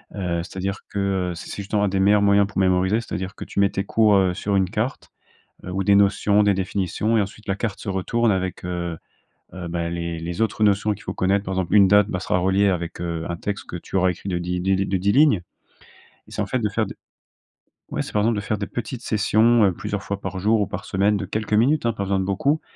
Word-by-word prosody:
Heu, 90 -4 -2
c'est-à-dire 95 +2 -4
que, 100 - -4 0.3
heu, - - -6
c'est 80 - -9
c'est - - -5
justement 100 +1 0
un - - +3
des 95 0 -1
meilleurs 100 +2 +4
moyens 100 0 +4
pour 100 - -4
mémoriser. 95 +3 +2
C'est-à-dire 95 -3 -5
que - - -7
tu - - -4
mets 100 0 +4
tes 100 - -2
cours, 105 0 +3
heu, 95 -2 +3
sur 100 +1 -1
une 95 -2 +2
carte, 110 +7 -3 0.5
heu, 90 - -6
ou 95 +1 -1
des 100 0 +5
notions, 100 +1 +3
des 100 -1 +3
définitions 95 +3 -1
et - - +4
ensuite 105 +2 -7
la 95 - 0
carte 105 0 -3
se - - -10
retourne 115 +5 0
avec, 95 -2 -2
heu, 85 -2 -3 0.6
heu, 90 -2 -6
bah 85 0 -2
les 85 -1 -4
les 85 +4 -5
autres 110 -1 +1
notions 105 +1 +2
qu'il 105 - -8
faut - - -4
connaître. 100 +2 +1
Par 95 - -3
exemple, 95 0 -1
une 100 -2 +7
date, 105 +1 +5
bah, 90 - -2
sera 90 - 0
reliée 95 +2 +2
avec, 85 -3 -3
heu, 85 -2 -3
un 85 - -2
texte 100 +3 -5
que - - -5
tu 85 - -12
auras 95 -1 +3
écrit 90 +2 -7
de 90 -2 -1
di 90 +1 -3
de 95 +1 +1
de 95 - -1
10 100 +2 +1
lignes. 145 +1 +5 0.9
Et - - -17
c'est - - -3
en - - 0
fait 130 - -1
de 110 - 0
faire - - 0
de - - -8 1.0
ouais, - - -1
c'est - - -8
par 105 - +2
exemple 115 +1 +2
de 105 - -2
faire 105 +1 -2
des 100 - -3
petites 120 0 -5
sessions, 110 +2 +3
heu, 95 - +2
plusieurs 105 +3 -4
fois 100 0 -4
par 95 -1 -5
jour 110 +3 +2
ou - - 0
par 95 +1 -6
semaine 105 0 +1
de 100 -1 -3
quelques 105 +2 -4
minutes 125 +5 +3
hein, 115 - +2
pas 100 -3 -4
besoin 100 0 0
de - - -1
beaucoup 135 +11 +1
100 Hz, 260 wpm, -23 LUFS, 95-105 Hz, 1.0 s, une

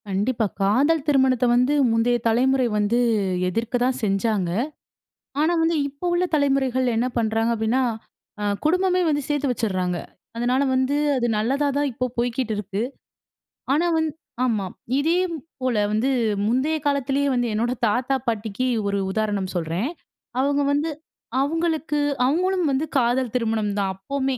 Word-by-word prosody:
கண்டிப்பா. 220 +4 0 0.2
காதல் 275 +10 +3
திருமணத்த 265 -3 +3
வந்து 250 +4 +3 0.2
முந்தைய 230 +2 +2
தலைமுறை 255 +3 +3
வந்து 210 +3 +2 0.5
எதிர்க்க 230 +6 -2
தான் 260 +1 0
செஞ்சாங்க. 195 -2 +1 0.9
ஆனா, 315 +3 +3
வந்து 325 +1 +2
இப்போ 285 +5 -8
உள்ள 350 +1 +2
தலைமுறைகள் 270 -3 +1
என்ன 240 +2 +1
பண்றாங்க 225 0 +1
அப்டின்னா, 225 +4 +1 0.6
அ - - -2 0.2
குடும்பமே 365 +3 +2
வந்து 290 -1 +1
சேத்து 290 -2 0
வச்சிட்றாங்க. 185 -7 -1 0.4
அதனால 250 +3 +1
வந்து 260 +2 +1 0.2
அது 240 -1 +1
நல்லதா 270 +7 +1
தான் 290 0 +1
இப்ப 255 +2 -2
போய்க்கிட்டு 240 -1 -1
இருக்கு. 205 0 -3 0.9
ஆனா 330 +5 +2
வந் 320 0 +1 0.4
ஆமா. 215 -6 0 0.3
இதேபோல 325 -6 -1 0.2
வந்து 220 +5 +1 0.4
முந்தைய 260 +8 +1
காலத்திலேயே 280 0 +1
வந்து 245 -1 +1
என்னோட 230 +3 0 0.2
தாத்தா 250 +5 +1
பாட்டிக்கு 225 +2 -1 0.2
ஒரு 200 0 0
உதாரணம் 205 -2 -1
சொல்றேன். 175 - -1 0.5
அவுங்க 285 +2 +2
வந்து 290 +3 +1 0.5
அவுங்களுக்கு 315 0 0 0.3
அவுங்களும் 360 +6 +1
வந்து 275 +3 0
காதல் 245 -1 +1
திருமணம் 220 -3 0
தான் 195 -1 0
அப்போமே. 265 +6 -2
255 Hz, 135 wpm, -23 LUFS, 220-285 Hz, 0.9 s, காதல்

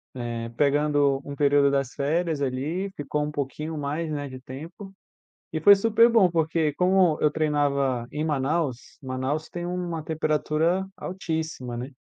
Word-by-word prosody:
eh, 115 -1 -4
pegando 145 -1 +2
um 140 - -6
período 140 0 +4
das 135 -2 -1
férias 155 +2 0
ali, 145 +9 -2
ficou 150 +1 -2
um 150 - -3
pouquinho 150 +3 -4
mais, 150 +3 -3
né, 145 -1 -3
de 130 0 -9
tempo, 165 +10 -10 0.6
e 160 - -1
foi 200 +4 +9
super 225 +3 +4
bom, 215 -6 +5
porque, 160 -2 +1
como 180 -2 +3
eu 150 - +3
treinava 140 -5 0
em 150 +1 -3
Manaus, 145 -2 -1
Manaus 130 +4 -3
tem 175 0 -5
uma 175 -3 -3
temperatura 160 +3 0
altíssima, 160 -9 -4
né. 125 +3 -5
150 Hz, 150 wpm, -25 LUFS, 140-165 Hz, 0.6 s, foi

